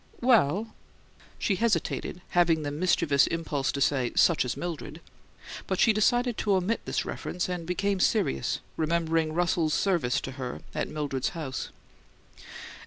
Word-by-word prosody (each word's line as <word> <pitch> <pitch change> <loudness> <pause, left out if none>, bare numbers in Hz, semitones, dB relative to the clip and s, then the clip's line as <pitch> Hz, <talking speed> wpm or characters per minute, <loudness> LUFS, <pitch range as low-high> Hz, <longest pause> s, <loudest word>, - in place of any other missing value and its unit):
"Well 220 - +3 0.3
" - - -27
She 195 - 0
hesitated, 220 -5 -1
having 170 -3 +3
the 145 - -3
mischievous 150 -3 +2
impulse 150 -4 -1
to 140 - -3
say, 130 -3 +1
"Such 170 -6 +4
as 125 - -3
Mildred!" 175 -4 -5 0.7
But 190 - -1
she 225 - +5
decided 240 +2 +2
to 205 -2 +2
omit 190 +5 0
this - - -1
reference, 180 - -3
and 175 -2 -4
became 195 +2 0
serious, 65 - +1 0.2
remembering 160 0 +1
Russell's 170 -2 +1
service 170 -11 +1
to 135 - -6
her 125 - -5
at - - -2
Mildred's 145 -4 -2
house. 135 -5 -4
170 Hz, 145 wpm, -27 LUFS, 145-190 Hz, 0.7 s, she